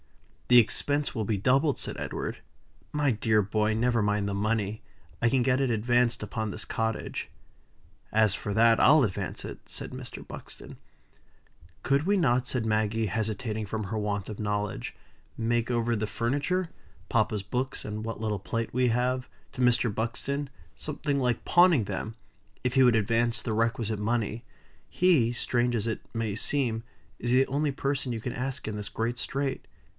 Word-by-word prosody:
"The 125 Hz, -, +7 dB
expense 145 Hz, +5 st, +3 dB
will 110 Hz, -, 0 dB
be 105 Hz, 0 st, 0 dB
doubled," 135 Hz, +8 st, +3 dB
said -, -, -4 dB
Edward. -, -, -4 dB, 0.5 s
"My 145 Hz, -2 st, +2 dB
dear 110 Hz, -1 st, +2 dB
boy! 105 Hz, +2 st, +1 dB
never 120 Hz, 0 st, +2 dB
mind 105 Hz, 0 st, +1 dB
the 100 Hz, -, -2 dB
money. 105 Hz, +1 st, -1 dB, 0.4 s
I 115 Hz, -, +4 dB
can 130 Hz, 0 st, +2 dB
get 130 Hz, +1 st, +2 dB
it 135 Hz, -, +2 dB
advanced 120 Hz, +1 st, +2 dB
upon 110 Hz, +1 st, -3 dB
this 110 Hz, -, -6 dB
cottage." 110 Hz, -1 st, -2 dB, 0.8 s
"As 110 Hz, -2 st, +4 dB
for 105 Hz, -, -4 dB
that, 115 Hz, 0 st, +6 dB
I'll 155 Hz, -1 st, +7 dB
advance 100 Hz, -6 st, -3 dB
it," -, -, -9 dB
said -, -, -5 dB
Mr. -, -, -8 dB
Buxton. -, -, -10 dB, 1.1 s
"Could 140 Hz, +1 st, +2 dB
we 200 Hz, +2 st, +3 dB
not," 130 Hz, -7 st, +2 dB
said 125 Hz, -3 st, -1 dB
Maggie, 110 Hz, 0 st, +1 dB
hesitating 110 Hz, +1 st, -2 dB
from 110 Hz, +1 st, -3 dB
her 110 Hz, +3 st, -3 dB
want 100 Hz, -2 st, -2 dB
of 105 Hz, -, -7 dB
knowledge, 105 Hz, -, -2 dB, 0.4 s
"make 115 Hz, 0 st, 0 dB
over 120 Hz, 0 st, +1 dB
the 110 Hz, 0 st, -1 dB
furniture 145 Hz, -, -1 dB, 0.4 s
papa's 110 Hz, -3 st, +1 dB
books, 125 Hz, +6 st, -3 dB
and 105 Hz, 0 st, -4 dB
what 115 Hz, -1 st, -4 dB
little 105 Hz, -2 st, -1 dB
plate 115 Hz, +4 st, -3 dB
we 125 Hz, +1 st, +3 dB
have, 125 Hz, +2 st, 0 dB, 0.2 s
to 130 Hz, -, -4 dB
Mr. 125 Hz, -2 st, +3 dB
Buxton 140 Hz, +6 st, -2 dB, 0.3 s
something 145 Hz, -1 st, -2 dB
like 125 Hz, -3 st, 0 dB
pawning 175 Hz, -8 st, +5 dB
them 105 Hz, +3 st, -4 dB, 0.5 s
if 125 Hz, -1 st, 0 dB
he 130 Hz, -, +5 dB
would 125 Hz, -2 st, +5 dB
advance 115 Hz, +2 st, +1 dB
the 115 Hz, -, -2 dB
requisite 115 Hz, -1 st, 0 dB
money? 115 Hz, +1 st, -1 dB, 0.5 s
He, 160 Hz, -11 st, +3 dB
strange 120 Hz, 0 st, 0 dB
as 115 Hz, 0 st, -1 dB
it 110 Hz, -, -2 dB
may 115 Hz, -3 st, -1 dB
seem, 115 Hz, -2 st, -1 dB, 0.4 s
is 120 Hz, -, -2 dB
the 130 Hz, +1 st, +4 dB
only 145 Hz, +2 st, 0 dB
person 135 Hz, -1 st, -2 dB
you 115 Hz, -, -2 dB
can 120 Hz, +2 st, -4 dB
ask 130 Hz, +1 st, -4 dB
in 110 Hz, -, -3 dB
this 105 Hz, -1 st, -5 dB
great 115 Hz, +2 st, -2 dB
strait." 135 Hz, 0 st, -2 dB
115 Hz, 170 wpm, -28 LUFS, 110-130 Hz, 1.1 s, The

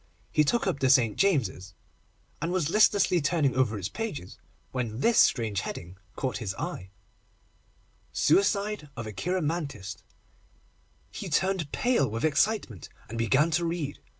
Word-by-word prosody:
He 150 Hz, -, +4 dB
took 235 Hz, +11 st, +1 dB
up 180 Hz, -7 st, -1 dB
the 130 Hz, -, +2 dB
St. 125 Hz, -5 st, +4 dB
James's, 110 Hz, -, 0 dB, 0.7 s
and 165 Hz, +2 st, -1 dB
was 175 Hz, -4 st, 0 dB
listlessly 205 Hz, -4 st, +4 dB
turning 140 Hz, -3 st, +1 dB
over 125 Hz, -5 st, +1 dB
its 95 Hz, -2 st, -3 dB
pages, 145 Hz, -, -6 dB, 0.3 s
when 120 Hz, -3 st, -3 dB
this 235 Hz, 0 st, +4 dB
strange 110 Hz, -6 st, +3 dB
heading 85 Hz, 0 st, -7 dB, 0.2 s
caught 130 Hz, -2 st, -2 dB
his 100 Hz, -5 st, -4 dB
eye: 95 Hz, 0 st, -5 dB, 1.2 s
SUICIDE 200 Hz, -, +1 dB
OF 115 Hz, -, -4 dB
A 110 Hz, -, -6 dB
CHEIROMANTIST. 150 Hz, -, -3 dB, 1.1 s
He -, -, -6 dB
turned 190 Hz, -6 st, 0 dB
pale 240 Hz, -, +1 dB
with 115 Hz, +6 st, -2 dB
excitement, 155 Hz, -, 0 dB, 0.2 s
and 115 Hz, -, -6 dB
began 135 Hz, +8 st, +3 dB
to 165 Hz, +3 st, +1 dB
read. 165 Hz, -4 st, -3 dB
140 Hz, 140 wpm, -28 LUFS, 110-180 Hz, 1.2 s, He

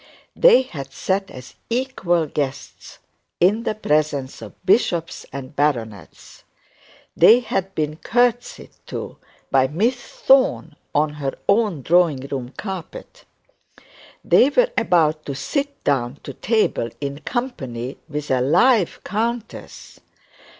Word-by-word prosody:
They 485 Hz, -, +6 dB
had 140 Hz, -, -8 dB
sat 195 Hz, +6 st, -2 dB
as 125 Hz, 0 st, -11 dB, 0.2 s
equal 230 Hz, -9 st, 0 dB
guests 145 Hz, -1 st, -5 dB, 0.4 s
in 200 Hz, +6 st, +3 dB
the 215 Hz, -, -1 dB
presence 150 Hz, -, -1 dB
of 110 Hz, -, -10 dB
bishops 175 Hz, -4 st, +1 dB
and 135 Hz, +1 st, -8 dB
baronets; 120 Hz, -9 st, -3 dB, 0.7 s
they 240 Hz, +3 st, +7 dB
had 195 Hz, -4 st, -3 dB
been 155 Hz, 0 st, -2 dB
curtseyed 245 Hz, +4 st, 0 dB, 0.2 s
to -, -, -6 dB, 0.3 s
by 130 Hz, -1 st, +4 dB
Miss 215 Hz, -, 0 dB
Thorne 245 Hz, -, +1 dB, 0.2 s
on 150 Hz, +1 st, +2 dB
her 135 Hz, -1 st, -2 dB
own 200 Hz, -, +2 dB
drawing 170 Hz, -4 st, +3 dB
room 130 Hz, -3 st, -4 dB
carpet; 210 Hz, -, -8 dB, 1.0 s
they 260 Hz, -, +5 dB
were -, -, +2 dB
about 155 Hz, -3 st, +2 dB
to 140 Hz, -, -3 dB
sit 280 Hz, -, -3 dB
down 135 Hz, -2 st, 0 dB
to 140 Hz, -, -7 dB
table 215 Hz, -, 0 dB
in 140 Hz, 0 st, -4 dB
company 135 Hz, -, -4 dB
with 150 Hz, -1 st, -4 dB
a 130 Hz, -1 st, +2 dB
live 180 Hz, -, +3 dB
countess! 230 Hz, +2 st, -5 dB
165 Hz, 120 wpm, -21 LUFS, 140-230 Hz, 1.0 s, they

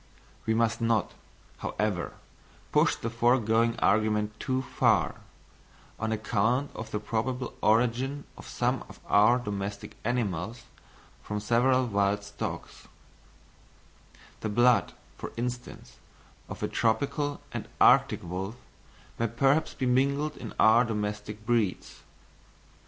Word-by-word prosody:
We 110 Hz, -, +2 dB
must 115 Hz, 0 st, +1 dB
not, 115 Hz, -3 st, +1 dB, 0.5 s
however, 105 Hz, -5 st, -2 dB, 0.6 s
push -, -, +3 dB
the 115 Hz, -, -4 dB
foregoing 115 Hz, -1 st, +2 dB
argument 105 Hz, +1 st, +1 dB
too 130 Hz, 0 st, -1 dB
far, -, -, +2 dB, 0.8 s
on 110 Hz, 0 st, -1 dB
account 110 Hz, +5 st, 0 dB
of 110 Hz, -, -7 dB
the 105 Hz, -, -2 dB
probable 125 Hz, +4 st, -2 dB
origin 125 Hz, +6 st, +2 dB
of -, -, -12 dB
some -, -, -1 dB
of -, -, -13 dB
our 105 Hz, +4 st, +5 dB
domestic 105 Hz, -2 st, -5 dB
animals 115 Hz, -1 st, -2 dB, 0.6 s
from 105 Hz, 0 st, -4 dB
several 130 Hz, +4 st, +3 dB
wild 100 Hz, -2 st, +1 dB
stocks: 100 Hz, 0 st, -6 dB, 1.5 s
the 110 Hz, -, -3 dB
blood, 120 Hz, -3 st, +3 dB, 0.3 s
for -, -, -6 dB
instance, 120 Hz, -, -5 dB, 0.5 s
of -, -, -7 dB
a -, -, +1 dB
tropical 145 Hz, +5 st, 0 dB
and -, -, -5 dB
arctic -, -, +5 dB
wolf 95 Hz, +5 st, -4 dB, 0.6 s
may 115 Hz, -, +2 dB
perhaps 135 Hz, +7 st, +1 dB
be 130 Hz, -, -2 dB
mingled 140 Hz, +4 st, +1 dB
in -, -, -7 dB
our 110 Hz, +2 st, +6 dB
domestic 105 Hz, -1 st, -4 dB
breeds. 110 Hz, -5 st, -1 dB
115 Hz, 115 wpm, -28 LUFS, 105-125 Hz, 1.5 s, our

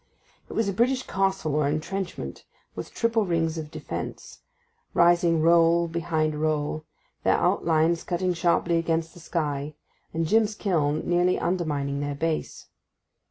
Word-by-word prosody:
It -, -, -7 dB
was 225 Hz, -, +1 dB
a 200 Hz, -, 0 dB
British 255 Hz, +5 st, +2 dB
castle 190 Hz, -5 st, 0 dB
or 150 Hz, -1 st, +2 dB
entrenchment, 180 Hz, +5 st, -4 dB, 0.3 s
with -, -, -6 dB
triple 230 Hz, -1 st, +1 dB
rings 165 Hz, -3 st, 0 dB
of 155 Hz, -1 st, -6 dB
defence, -, -, -7 dB, 0.6 s
rising 170 Hz, -2 st, +4 dB
roll 170 Hz, 0 st, +5 dB
behind 160 Hz, -2 st, -1 dB
roll, 155 Hz, 0 st, -1 dB, 0.4 s
their -, -, +3 dB
outlines 165 Hz, +1 st, +2 dB
cutting 180 Hz, 0 st, 0 dB
sharply 170 Hz, 0 st, +2 dB
against 165 Hz, 0 st, -1 dB
the -, -, -13 dB
sky, 150 Hz, -3 st, -3 dB, 0.4 s
and 165 Hz, 0 st, -1 dB
Jim's 215 Hz, +4 st, +2 dB
kiln 155 Hz, -7 st, 0 dB
nearly 175 Hz, +1 st, +3 dB
undermining 150 Hz, -6 st, -1 dB
their 145 Hz, 0 st, -2 dB
base. 160 Hz, +2 st, -3 dB
165 Hz, 135 wpm, -26 LUFS, 155-180 Hz, 0.6 s, roll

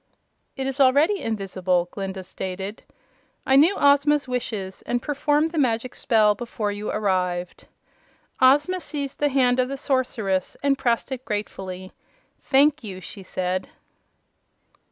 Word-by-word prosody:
"It 265 Hz, -, -2 dB
is 270 Hz, +1 st, -3 dB
already 285 Hz, +9 st, +4 dB
invisible," 185 Hz, -4 st, -1 dB
Glinda 190 Hz, -1 st, -5 dB
stated. 190 Hz, +3 st, -6 dB, 0.6 s
"I 265 Hz, -, +3 dB
knew 320 Hz, +8 st, +6 dB
Ozma's 285 Hz, 0 st, +3 dB
wishes, 215 Hz, -6 st, -4 dB
and 245 Hz, -, 0 dB
performed 295 Hz, +3 st, 0 dB
the 330 Hz, -, -1 dB
Magic 245 Hz, -2 st, 0 dB
Spell 215 Hz, -2 st, +3 dB
before 210 Hz, -1 st, -4 dB
you 205 Hz, +1 st, -5 dB
arrived." 180 Hz, -4 st, -1 dB, 0.7 s
Ozma 290 Hz, +8 st, +4 dB
seized 290 Hz, -4 st, -4 dB
the 290 Hz, -, +2 dB
hand 255 Hz, -2 st, +2 dB
of 255 Hz, -, +2 dB
the 275 Hz, -, -4 dB
Sorceress 230 Hz, -9 st, -1 dB
and 280 Hz, -1 st, +3 dB
pressed 240 Hz, -1 st, 0 dB
it 255 Hz, -1 st, -4 dB
gratefully. 190 Hz, -4 st, -5 dB, 0.5 s
"Thank 290 Hz, +1 st, +3 dB
you!" 190 Hz, -4 st, -7 dB
she 190 Hz, +2 st, -9 dB
said. 185 Hz, 0 st, -3 dB
240 Hz, 135 wpm, -24 LUFS, 195-275 Hz, 0.7 s, knew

